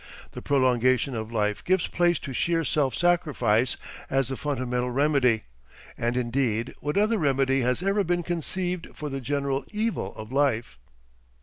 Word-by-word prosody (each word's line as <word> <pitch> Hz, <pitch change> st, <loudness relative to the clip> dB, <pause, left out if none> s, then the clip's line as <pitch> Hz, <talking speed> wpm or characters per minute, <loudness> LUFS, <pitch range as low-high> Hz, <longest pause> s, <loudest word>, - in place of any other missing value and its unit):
The -, -, -8 dB
prolongation 130 Hz, -1 st, +2 dB
of 110 Hz, -1 st, -4 dB
life 105 Hz, -1 st, -1 dB
gives 185 Hz, -1 st, +2 dB
place 175 Hz, 0 st, +2 dB
to 135 Hz, -, -6 dB
sheer 165 Hz, +4 st, +1 dB
self 135 Hz, 0 st, +1 dB
sacrifice 130 Hz, -9 st, +2 dB, 0.3 s
as 135 Hz, -2 st, +1 dB
the 135 Hz, -, -2 dB
fundamental 125 Hz, -3 st, -2 dB
"remedy." 130 Hz, -4 st, +2 dB, 0.5 s
And 120 Hz, +1 st, -1 dB
indeed 120 Hz, -2 st, 0 dB
what 150 Hz, +4 st, -2 dB
other 215 Hz, +2 st, +3 dB
remedy 135 Hz, -3 st, +2 dB
has 125 Hz, +7 st, 0 dB
ever 200 Hz, +1 st, +2 dB
been 175 Hz, 0 st, 0 dB
conceived 175 Hz, +1 st, -3 dB
for 150 Hz, -, -5 dB
the 135 Hz, -1 st, -4 dB
general 140 Hz, +1 st, -1 dB
evil 220 Hz, +1 st, -2 dB
of 110 Hz, +2 st, -9 dB
life? 120 Hz, -, 0 dB
135 Hz, 150 wpm, -26 LUFS, 125-165 Hz, 0.5 s, other